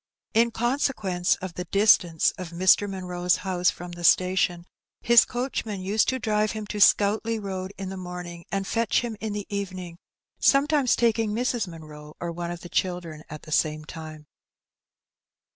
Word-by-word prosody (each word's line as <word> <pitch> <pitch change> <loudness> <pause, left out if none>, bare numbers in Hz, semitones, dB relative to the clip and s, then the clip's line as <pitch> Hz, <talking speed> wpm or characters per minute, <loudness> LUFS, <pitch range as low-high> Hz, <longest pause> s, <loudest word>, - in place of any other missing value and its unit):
In 230 +1 +4
consequence 225 -7 0
of 185 -2 -5
the 180 - -5
distance 180 -4 +4
of 180 -2 -6
Mr. 185 +4 +3
Munroe's 180 -2 -1
house 180 -1 +2
from 175 0 -7
the 175 0 -9
station, 180 0 +3 0.4
his 235 0 +7
coachman 240 -5 -3
used 200 +4 +1
to 260 - 0
drive 215 -2 0
him 215 -1 -5
to 210 - -4
Scoutleigh 215 +3 +4
Road 190 -2 -5
in 195 -1 -5
the 190 - -6
morning 180 -1 -7
and 195 0 -1
fetch 230 +1 +1
him 235 -2 -4
in 215 -1 -4
the 205 -1 -4
evening, 185 -4 -5 0.4
sometimes 280 -2 +3
taking 225 -2 +1
Mrs. 240 -2 -1
Munroe, 155 -3 -11
or 170 -1 -3
one 170 0 -5
of 175 0 -6
the - - -9
children, 175 -3 -3
at 150 0 -9
the 155 - -11
same 155 0 0
time. 155 -1 -9
185 Hz, 165 wpm, -25 LUFS, 175-220 Hz, 0.4 s, his